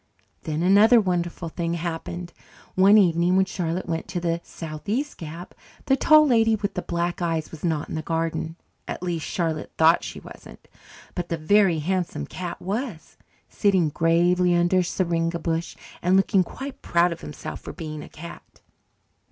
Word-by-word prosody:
Then 155 Hz, +1 st, -2 dB
another 210 Hz, +6 st, +6 dB
wonderful 175 Hz, -3 st, -1 dB
thing 170 Hz, +1 st, -2 dB
happened. 170 Hz, +1 st, -5 dB, 0.4 s
One 195 Hz, +3 st, +6 dB
evening 175 Hz, -2 st, +3 dB
when 190 Hz, 0 st, +4 dB
Charlotte 175 Hz, -2 st, -3 dB
went 165 Hz, -1 st, -3 dB
to 180 Hz, -, -3 dB
the 170 Hz, -1 st, -1 dB
southeast 200 Hz, -, -4 dB
gap, 165 Hz, +2 st, -8 dB, 0.3 s
the 270 Hz, -, +4 dB
Tall 305 Hz, +3 st, +6 dB
Lady 225 Hz, -4 st, +4 dB
with 205 Hz, -1 st, -3 dB
the 180 Hz, -, -3 dB
Black 175 Hz, +1 st, -2 dB
Eyes 165 Hz, -2 st, -1 dB
was 160 Hz, -, -11 dB
not 160 Hz, -4 st, -1 dB
in -, -, -7 dB
the 155 Hz, -, -2 dB
garden 165 Hz, 0 st, -2 dB, 0.3 s
at -, -, -5 dB
least, 170 Hz, -3 st, -2 dB
Charlotte 165 Hz, -3 st, -2 dB
thought 160 Hz, +1 st, +5 dB
she -, -, -6 dB
wasn't. -, -, -13 dB, 0.5 s
But 175 Hz, -2 st, -4 dB
the 165 Hz, -, -1 dB
Very 185 Hz, +2 st, +3 dB
Handsome 175 Hz, -, -2 dB
Cat 180 Hz, -, -6 dB
was, 205 Hz, -, -4 dB, 0.3 s
sitting 190 Hz, -6 st, +2 dB
gravely 175 Hz, +3 st, +3 dB
under 175 Hz, +2 st, +3 dB
a -, -, +2 dB
syringa 170 Hz, -1 st, -1 dB
bush 165 Hz, 0 st, -2 dB, 0.3 s
and 180 Hz, +2 st, +3 dB
looking 195 Hz, 0 st, +3 dB
quite 270 Hz, +9 st, -8 dB
proud 170 Hz, +1 st, +2 dB
of 170 Hz, -, -6 dB
himself 75 Hz, -, -7 dB
for -, -, -8 dB
being 155 Hz, -2 st, -7 dB
a -, -, -10 dB
cat. 170 Hz, +2 st, -12 dB
175 Hz, 170 wpm, -24 LUFS, 165-190 Hz, 0.5 s, another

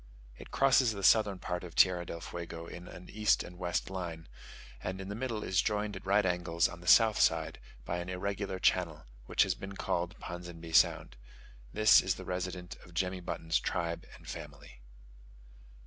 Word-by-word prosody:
It -, -, -12 dB
crosses 135 Hz, -3 st, +4 dB
the 100 Hz, -1 st, -6 dB
southern 100 Hz, -1 st, +5 dB
part 90 Hz, 0 st, -4 dB
of 85 Hz, -2 st, -9 dB
Tierra 90 Hz, -2 st, +4 dB
del 85 Hz, -, -6 dB
Fuego 85 Hz, -1 st, -7 dB
in 90 Hz, +1 st, -9 dB
an 90 Hz, -, -11 dB
east 105 Hz, -1 st, +2 dB
and 90 Hz, 0 st, -12 dB
west 85 Hz, +1 st, -2 dB
line, 85 Hz, -3 st, -5 dB, 0.5 s
and 95 Hz, +1 st, -4 dB
in 95 Hz, 0 st, -6 dB
the 100 Hz, -, -4 dB
middle 115 Hz, -3 st, -3 dB
is 95 Hz, 0 st, +2 dB
joined 105 Hz, -1 st, -1 dB
at 95 Hz, -, -9 dB
right 100 Hz, +1 st, +3 dB
angles 90 Hz, -1 st, +1 dB
on 85 Hz, -, -10 dB
the 85 Hz, -, -12 dB
south 110 Hz, +2 st, +6 dB
side -, -, +2 dB, 0.3 s
by 85 Hz, -, -2 dB
an 90 Hz, +1 st, -5 dB
irregular 95 Hz, +1 st, -3 dB
channel, 90 Hz, -4 st, +1 dB, 0.2 s
which -, -, +4 dB
has 95 Hz, -, 0 dB
been 95 Hz, +1 st, -8 dB
called 85 Hz, -2 st, -2 dB
Ponsonby 85 Hz, -2 st, -8 dB
Sound. 70 Hz, -, +3 dB, 0.5 s
This 110 Hz, 0 st, +6 dB
is 95 Hz, -1 st, 0 dB
the 95 Hz, -, -9 dB
residence 90 Hz, 0 st, -4 dB
of 90 Hz, -2 st, -16 dB
Jemmy 90 Hz, +1 st, -1 dB
Button's 85 Hz, -2 st, -1 dB
tribe 85 Hz, -2 st, -3 dB
and -, -, -16 dB
family. -, -, -9 dB
90 Hz, 180 wpm, -32 LUFS, 85-100 Hz, 0.5 s, south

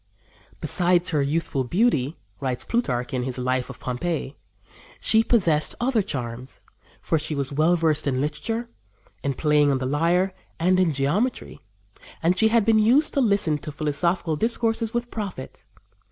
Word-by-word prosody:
"Besides 180 Hz, 0 st, +1 dB
her 150 Hz, -3 st, +2 dB
youthful 140 Hz, -1 st, -1 dB
beauty," 165 Hz, -, +1 dB, 0.2 s
writes 130 Hz, -2 st, -2 dB
Plutarch, 125 Hz, -, -1 dB
in 130 Hz, -, 0 dB
his 125 Hz, 0 st, -4 dB
Life 130 Hz, 0 st, -1 dB
of -, -, -9 dB
Pompey, 140 Hz, +2 st, -3 dB, 0.6 s
"she 220 Hz, 0 st, +3 dB
possessed 170 Hz, -11 st, +2 dB
other 240 Hz, -2 st, +2 dB
charms, 125 Hz, -, -6 dB, 0.4 s
for 160 Hz, -, 0 dB
she 155 Hz, 0 st, -2 dB
was 140 Hz, -1 st, -2 dB
well 155 Hz, +5 st, +3 dB
versed 155 Hz, -3 st, +1 dB
in 130 Hz, -2 st, 0 dB
literature, 185 Hz, -, -2 dB, 0.6 s
in 140 Hz, -1 st, -2 dB
playing 150 Hz, 0 st, +3 dB
on 135 Hz, -, +2 dB
the 130 Hz, -, -3 dB
lyre, 170 Hz, +7 st, +1 dB, 0.3 s
and 185 Hz, +2 st, +3 dB
in 180 Hz, -3 st, +3 dB
geometry, 150 Hz, -, -1 dB, 0.6 s
and 175 Hz, +3 st, +3 dB
she 220 Hz, +4 st, +4 dB
had 225 Hz, -1 st, +3 dB
been 220 Hz, -1 st, +4 dB
used 255 Hz, +8 st, +3 dB
to 280 Hz, -, +2 dB
listen 200 Hz, -, +2 dB
to 150 Hz, -, -6 dB
philosophical 155 Hz, +3 st, 0 dB
discourses 225 Hz, +3 st, 0 dB
with 240 Hz, 0 st, -3 dB
profit. 195 Hz, -11 st, -7 dB
160 Hz, 155 wpm, -24 LUFS, 140-210 Hz, 0.6 s, she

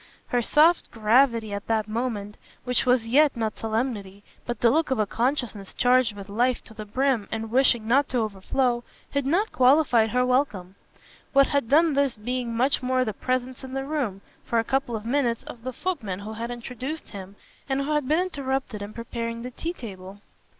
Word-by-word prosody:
Her 245 Hz, -, +2 dB
soft 315 Hz, +8 st, +4 dB
gravity 230 Hz, -1 st, +2 dB
at 200 Hz, 0 st, -5 dB
that 220 Hz, -2 st, 0 dB
moment 215 Hz, -2 st, -3 dB, 0.3 s
which 250 Hz, +1 st, 0 dB
was 250 Hz, -2 st, +3 dB
yet 280 Hz, +2 st, +4 dB
not 220 Hz, -2 st, -2 dB
solemnity, 220 Hz, -4 st, -3 dB, 0.2 s
but 240 Hz, -, -3 dB
the 235 Hz, -, +4 dB
look 320 Hz, +2 st, +2 dB
of 265 Hz, -, +1 dB
a 215 Hz, -, +2 dB
consciousness 230 Hz, -3 st, -2 dB
charged 250 Hz, -3 st, +3 dB
with 200 Hz, -1 st, -9 dB
life 240 Hz, +5 st, 0 dB
to -, -, -14 dB
the 215 Hz, -1 st, -8 dB
brim 255 Hz, -1 st, +1 dB
and 220 Hz, 0 st, -4 dB
wishing 240 Hz, -3 st, +3 dB
not 270 Hz, +4 st, +3 dB
to 255 Hz, -, -1 dB
overflow 240 Hz, +3 st, 0 dB, 0.3 s
had 280 Hz, -1 st, -1 dB
not 385 Hz, +9 st, +1 dB
qualified 255 Hz, -4 st, +4 dB
her 250 Hz, +2 st, +2 dB
welcome; 235 Hz, -8 st, 0 dB, 0.6 s
what 275 Hz, 0 st, +6 dB
had 280 Hz, -5 st, 0 dB
done 315 Hz, +2 st, +5 dB
this 280 Hz, -2 st, +1 dB
being 245 Hz, +2 st, -3 dB
much 270 Hz, +5 st, +2 dB
more 255 Hz, 0 st, +1 dB
the 215 Hz, -, -2 dB
presence 255 Hz, +3 st, -2 dB
in 260 Hz, 0 st, -7 dB
the 270 Hz, 0 st, -2 dB
room, 265 Hz, -10 st, -2 dB, 0.2 s
for 235 Hz, -, -1 dB
a 225 Hz, -, +3 dB
couple 265 Hz, -1 st, -1 dB
of 215 Hz, 0 st, -6 dB
minutes, 240 Hz, -2 st, 0 dB
of 235 Hz, -, -10 dB
the 255 Hz, +2 st, -4 dB
footman 235 Hz, -, -3 dB
who 215 Hz, +2 st, -6 dB
had 230 Hz, +2 st, -5 dB
introduced 250 Hz, +5 st, -6 dB
him 195 Hz, -1 st, -9 dB, 0.3 s
and 270 Hz, +1 st, +1 dB
who 280 Hz, +2 st, -2 dB
had 295 Hz, -3 st, 0 dB
been 310 Hz, +4 st, +3 dB
interrupted 270 Hz, -, -3 dB
in 205 Hz, +1 st, -7 dB
preparing 230 Hz, 0 st, -5 dB
the 250 Hz, -, -6 dB
tea 330 Hz, +7 st, -4 dB
table. 195 Hz, -, -9 dB
245 Hz, 195 wpm, -25 LUFS, 220-270 Hz, 0.6 s, what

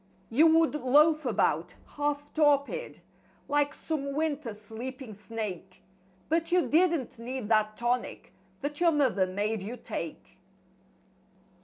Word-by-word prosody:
You 300 Hz, +8 st, +6 dB
would 325 Hz, -1 st, +4 dB
loaf 300 Hz, +2 st, +4 dB
about, 175 Hz, -6 st, 0 dB
half 290 Hz, 0 st, -3 dB
torpid, 295 Hz, -, +1 dB, 0.5 s
like 290 Hz, 0 st, +2 dB
some 280 Hz, -3 st, -3 dB
winter 300 Hz, -5 st, -1 dB
sleeping 225 Hz, +3 st, -8 dB
snake. 200 Hz, -3 st, -7 dB, 0.4 s
But 330 Hz, +1 st, 0 dB
you 360 Hz, -1 st, +3 dB
DIDN'T 325 Hz, -7 st, +1 dB
need 245 Hz, -1 st, -5 dB
that 215 Hz, -1 st, +2 dB
tonic 240 Hz, +1 st, -2 dB, 0.3 s
that 290 Hz, +3 st, -4 dB
your 340 Hz, -1 st, +5 dB
mother 235 Hz, -11 st, +2 dB
made 205 Hz, +3 st, -2 dB
you 225 Hz, +6 st, -6 dB
take. -, -, -7 dB
270 Hz, 120 wpm, -29 LUFS, 220-300 Hz, 0.5 s, You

